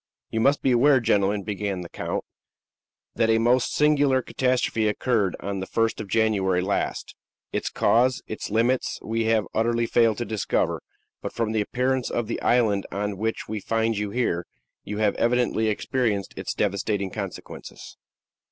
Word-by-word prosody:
"You 110 - -1
must 140 +5 +3
be 130 - +3
aware, 130 +3 +5
gentlemen," 100 -3 +1
began 100 -2 -3
the 85 - -8
count, - - -3 0.9
"that 115 -1 +1
a 110 - +4
most 120 +2 +2
singular 145 -3 +3
catastrophe 125 -4 0
occurred 105 -3 +1
on 100 -1 -4
the 95 - -5
1st 115 0 0
of 105 - -7
January 100 -4 +2
last. 95 +3 -2 0.4
Its - - -1
cause, 125 +2 +2
its 110 - -5
limits 115 +4 +1
we 115 0 -1
have 110 -1 +2
utterly 115 +1 +1
failed 115 -1 +3
to 120 - -2
discover, 110 -3 -1 0.4
but - - -5
from 115 -2 -1
the 110 -1 +1
appearance 125 +4 0
of 120 - -1
the 115 - -4
island 110 -5 +2
on 105 0 -2
which 110 +3 -2
we 110 0 -3
find 115 +2 0
you 105 0 -2
here, 100 -6 -1 0.4
you 105 - -5
have 105 -1 +2
evidently 120 -2 +1
experienced 110 -2 -1
its - - -4
devastating 100 -1 -1
consequences." 100 -4 -8
110 Hz, 160 wpm, -25 LUFS, 105-120 Hz, 0.9 s, aware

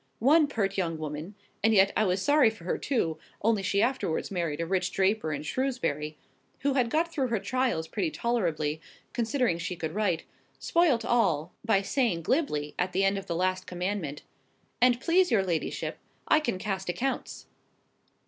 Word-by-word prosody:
One 295 +6 +5
pert 195 -6 -1
young 165 -3 -1
woman—and 170 +8 -3
yet 195 0 +5
I 215 - +3
was 185 0 0
sorry 290 -5 +5
for 220 -6 -11
her 180 - -2
too, 165 - -1 0.2
only 220 -2 +3
she 200 +2 +1
afterwards 245 -11 -1
married 170 -5 -2
a 165 - -1
rich 185 +1 0
draper 195 -3 +1
in 145 0 -3
Shrewsbury—who 245 - -3
had 250 -3 +2
got 330 +5 0
through 270 -5 0
her 230 -2 0
trials 210 -5 -1
pretty 185 -3 -1
tolerably, 160 -5 -1 0.3
considering 235 -6 0
she 180 +1 -3
could 160 -2 -4
write, 190 -5 0 0.3
spoilt 300 -10 +2
all, 175 -10 +1
by 210 -3 +2
saying 210 -8 0
glibly, 150 - 0
at 180 +1 0
the 195 - +2
end 195 0 +2
of 195 - -11
the 170 - -2
last 185 +1 0
Commandment, 180 -5 -3 0.6
"An't 245 -1 +5
please 355 +6 +3
your 210 -5 +3
ladyship, 170 -4 -2 0.3
I - - +5
can 300 -11 -2
cast 190 -1 -3
accounts." 265 +9 -3
195 Hz, 165 wpm, -28 LUFS, 170-240 Hz, 0.6 s, One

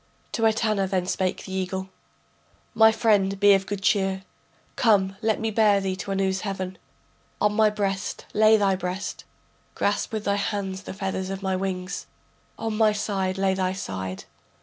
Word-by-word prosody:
To 225 -1 +2
Etana 215 -3 +1
then 185 -2 0
spake 185 0 -1
the 190 - -7
eagle: 190 0 -3 0.8
My 220 -1 +6
friend, 200 -4 +2
be 205 0 +7
of 195 -1 +1
good 200 -1 -4
cheer. 190 -2 +1 0.5
Come, 195 -5 +3
let 220 -1 +1
me 225 0 -1
bear 210 -2 +4
thee 190 -1 -2
to 185 +1 -6
Anu's 195 -1 0
heaven, 190 -2 -4 0.6
On 210 0 +2
my 215 0 +4
breast 195 -2 -3
lay 215 +1 +6
thy 200 -2 +2
breast, 185 +1 -4 0.5
Grasp 205 0 0
with 215 -2 -3
thy 200 0 +1
hands 195 -2 -2
the 195 - -8
feathers 190 -1 -3
of 195 0 -5
my 190 -1 0
wings. 185 0 -3 0.5
On 225 -1 -3
my 215 -1 +4
side 195 -3 -1
lay 190 0 +2
thy 185 -1 0
side. 95 - -5
195 Hz, 170 wpm, -25 LUFS, 190-210 Hz, 0.8 s, be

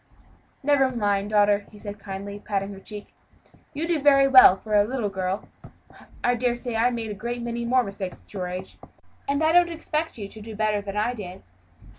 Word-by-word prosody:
"Never 275 -2 +3
mind, 205 -4 0
daughter," 205 -1 +3
he 210 - -14
said 205 0 -8
kindly, 200 +1 -7
patting 200 -1 -3
her 195 - -10
cheek; 210 +1 -9 0.6
"you 320 +3 -2
do 340 -3 +1
very 275 -1 +5
well 255 -8 +8
for 215 +2 -7
a 205 -1 +6
little 230 -1 -2
girl; 190 0 -3 0.8
I 245 - +3
dare 245 0 0
say 240 -1 -5
I 230 +2 +3
made 230 -3 -4
a - - -3
great 235 +4 -5
many 235 0 -3
more 250 +1 +3
mistakes 195 -3 -6
at - - -17
your 185 -3 -3
age, 185 +1 -7 0.5
and 285 +2 +1
I 315 - +4
don't 350 0 +5
expect 325 -2 -3
you 205 -3 -6
to 215 +2 -12
do 220 +1 -8
better 215 -1 0
than 200 0 -6
I 220 +4 +1
did." 190 -5 -9
215 Hz, 205 wpm, -25 LUFS, 200-250 Hz, 0.8 s, well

